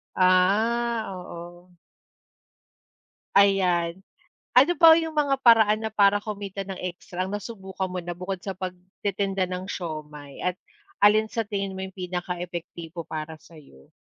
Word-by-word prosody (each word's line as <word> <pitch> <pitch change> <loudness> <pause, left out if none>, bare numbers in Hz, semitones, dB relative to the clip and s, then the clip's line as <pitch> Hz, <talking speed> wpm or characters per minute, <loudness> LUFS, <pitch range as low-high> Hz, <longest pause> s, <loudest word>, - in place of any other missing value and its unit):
Ah, 220 +6 +3
oo. 175 0 -10 1.6
Ayan, 185 -3 +3 0.5
ano 295 +7 +7
ba 330 -1 +8
yung 325 -1 -2
mga 285 -3 +2
paraan 220 -1 +6
na 220 - -4
para 200 -1 +5
kumita 200 -2 -5
ng 195 -1 -7
extra, 180 +1 -4
nasubukan 195 -2 -5
mo 180 -1 -4
na 175 0 -6
bukod 185 0 -4
sa 195 -2 -5
pagtitinda 190 +1 -3
ng 185 +2 -5
siomai, 150 -4 -7
at 180 0 -1 0.4
alin 215 +1 +4
sa 225 -2 -2
tingin 195 -2 -3
mo 190 - -4
yung 190 - -11
pinaka-epektibo 175 -2 -5
para 155 0 -6
sayo? 145 - -18
190 Hz, 130 wpm, -25 LUFS, 175-205 Hz, 1.6 s, ba